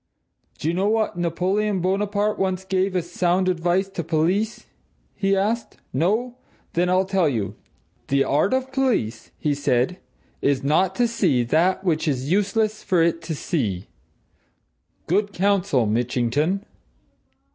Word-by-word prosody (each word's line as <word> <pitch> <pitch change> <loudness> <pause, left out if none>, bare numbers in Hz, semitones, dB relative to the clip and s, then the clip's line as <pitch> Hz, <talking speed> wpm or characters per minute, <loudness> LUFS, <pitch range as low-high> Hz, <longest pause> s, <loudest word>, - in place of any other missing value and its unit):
"Do - - -4
you 165 - +1
know 190 +3 +1
what 220 -2 +1
Napoleon 185 +4 0
Bonaparte 205 +3 0
once 190 -1 -1
gave 190 0 0
as 175 -1 -2
sound 180 +1 +1
advice 180 +2 +1
to 180 -3 -4
police?" 175 +8 0 0.5
he 195 -1 +1
asked. 220 +4 -1 0.2
"No! 220 - 0 0.4
Then 175 +1 +1
I'll 185 +1 +3
tell 190 -4 +2
you. 110 -7 -2 0.5
'The 140 0 +3
art 150 +8 +1
of 260 0 +1
the 265 - -23
police,' 255 - 0
he 150 - 0
said, 140 +4 0 0.4
'is 140 -1 +1
not 175 +7 +2
to 245 -1 +2
see 190 - +1
that 165 +10 +2
which 160 -4 0
it - - +4
is 130 +4 -5
useless 210 +2 +1
for 175 -3 +2
it 165 0 +1
to 160 -1 -4
see.' 105 - -2 1.2
Good 200 +4 0
counsel, 190 - +2
Mitchington!" 125 - 0
185 Hz, 145 wpm, -23 LUFS, 155-200 Hz, 1.2 s, it